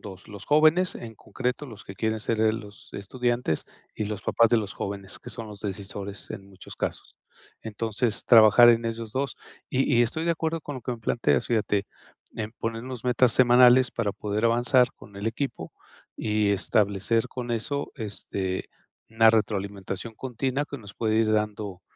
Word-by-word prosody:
dos, 95 -1 -10
los 100 -1 -10
jóvenes, 155 +5 +4
en 115 -1 -8
concreto, 125 +5 -4
los 110 -5 -11
que 95 - -9
quieren 110 +1 -1
ser, 110 +1 -1
eh, 110 0 +3
los 105 -2 -10
estudiantes, 120 -3 -1 0.3
y 105 - -3
los 105 -1 -5
papás 115 -1 +3
de 120 - +4
los 105 -3 -2
jóvenes, 100 0 -5
que - - -11
son 115 -2 -7
los 105 -2 -10
decisores 100 0 -5
en 95 - -7
muchos 95 -2 -12
casos. - - -4 0.5
Entonces, 110 0 -1
trabajar 115 +1 +8
en 115 0 +2
esos 115 -1 -5
dos. 135 +1 -2 0.3
Y 135 +2 +1
y 120 - +5
estoy 160 +8 -1
de 170 - +2
acuerdo 160 -1 -2
con 145 -2 -6
lo - - -7
que 125 - -3
me 120 - -7
planteas, 110 -10 +1
fíjate, 105 -3 +1 0.5
en 110 -1 -4
ponernos 115 +2 -5
metas 125 -1 +4
semanales 125 0 +6
para 105 -4 -2
poder 105 +2 -1
avanzar 120 +2 +4
con 100 - -15
el 100 +2 -4
equipo 135 +5 -3 0.5
y 105 -1 +1
establecer 100 +3 +1
con 125 -1 -6
eso, 130 +5 -2
este, 100 -4 -3 0.4
una 115 0 +6
retroalimentación 100 -1 -1
continua 130 +3 -2
que 140 -2 -8
nos 100 -2 -12
puede 110 -1 0
ir 110 -1 +3
dando, 105 -3 -2
110 Hz, 175 wpm, -26 LUFS, 105-125 Hz, 0.5 s, trabajar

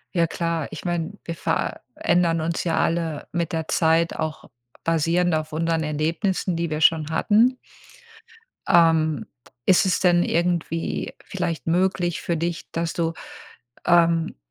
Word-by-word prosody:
Ja 170 -1 +3
klar, 165 -2 -2
ich 160 - -8
meine, 175 0 -2
wir 170 - -5
verändern 165 +3 0
uns 165 +2 -2
ja 165 - 0
alle 165 -3 -1
mit 170 +1 -2
der 160 -1 -3
Zeit 165 0 +2
auch 155 -1 -4 0.3
basierend 165 +2 +1
auf 155 0 -3
unseren 165 0 0
Erlebnissen, 165 +4 -1
die 170 0 -1
wir 155 0 -3
schon 155 -1 +4
hatten. 230 +8 +3 1.1
Ähm, 160 -2 +3 0.4
ist 185 0 +5
es 185 - +1
denn 175 -1 +4
irgendwie 170 -1 -1
vielleicht 170 -4 -4
möglich 175 0 +1
für 170 - -1
dich, 170 0 -3
dass 165 0 -2
du, 165 -1 -1 0.7
ähm, 170 -1 +3
165 Hz, 135 wpm, -23 LUFS, 160-175 Hz, 1.1 s, ist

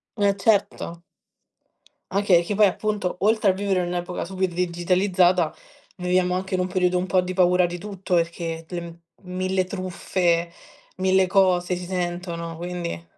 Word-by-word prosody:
Eh 200 -2 +2
certo. 195 -4 0 1.1
Anche 190 -3 +4
che 205 - -3
poi 210 0 +6
appunto, 205 -1 -2
oltre 215 -1 +3
a - - -2
vivere 195 -1 0
in 175 - -2
un'epoca 175 0 -3
super 190 +1 -1
digitalizzata, 180 0 +2 0.4
viviamo 180 0 +1
anche 190 +1 -4
in 185 - +1
un 180 - 0
periodo 180 -1 +1
un 180 +1 -1
po' 185 +1 +3
di 180 0 -4
paura 180 -1 +4
di 175 0 -5
tutto, 195 -2 -3
perché 165 -1 -2
le 175 -1 -4
m 170 0 -10 0.4
mille 185 0 0
truffe, 180 -2 -1 0.5
1.000 190 0 +3
cose 180 -2 +2
si 180 0 -6
sentono, 175 -2 -4
quindi 175 - -5
180 Hz, 155 wpm, -24 LUFS, 175-190 Hz, 1.1 s, poi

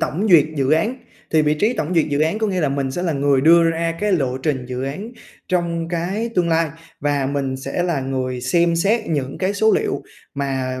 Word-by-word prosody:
tổng 190 +8 -1
duyệt 160 -5 +7
dự 135 -1 +1
án. 210 +11 +2 0.4
Thì 155 -1 +4
vị 150 0 +2
trí 210 +10 +1
tổng 175 -5 -2
duyệt 165 -2 +3
dự 145 0 0
án 160 +7 +1
có 220 - 0
nghĩa 185 -3 -1
là 150 - +1
mình 135 -1 -1
sẽ 175 +7 -3
là 170 -3 0
người 140 -1 +2
đưa 165 +4 +6
ra 165 0 -1
cái 210 -1 +1
lộ 130 -6 0
trình 130 -2 -2
dự 125 0 -4
án 190 - -5 0.4
trong 170 -2 -1
cái 185 +7 -2
tương 175 -2 +2
lai, 165 -1 +2 0.3
và 145 -2 0
mình 135 -2 -2
sẽ 135 +6 -3
là 170 -5 0
người 130 -1 -3
xem 170 +7 +2
xét 215 +6 +1
những 140 -4 -2
cái 195 +2 0
số 220 +2 +3
liệu - - -3 0.3
mà 130 -2 -2
160 Hz, 230 wpm, -20 LUFS, 135-175 Hz, 0.4 s, duyệt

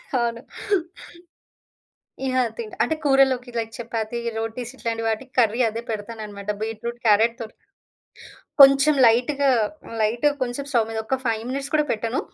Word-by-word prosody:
అవును. 235 -1 0 1.8
ఇ - - 0
ఆ! - - +3
తింట్ 225 -2 -7
అంటే, 315 - 0
కూరల్లోకి 270 -3 +3
లైక్ 225 -1 -2
చపాతీ, 230 -1 -4 0.2
రోటీస్ 225 +2 -4
ఇట్లాంటి 230 -3 -3
వాటికి 225 +4 -3
కర్రీ 230 0 +2
అదే 225 +1 -5
పెడతాననమాట, 210 -1 -5
బీట్రూట్ 225 +2 -4
క్యారట్‌ 225 +2 +4
తోర్ 220 -1 -7 1.1
కొంచెం 275 +2 +7
లైట్‌గా, 270 +5 +3 0.4
హ్మ్, 230 - -8
లైట్‌గా 240 +7 +2
కొంసేపు 255 +3 -3
స్టవ్ 230 -3 +2
మీద, 225 - -4
ఒక్క 265 - 0
5 225 -1 -1
మినిట్స్ 275 +1 -4
కూడా 300 -1 +3
పెట్టను. 230 +3 -2
235 Hz, 140 wpm, -23 LUFS, 225-265 Hz, 1.8 s, కొంచెం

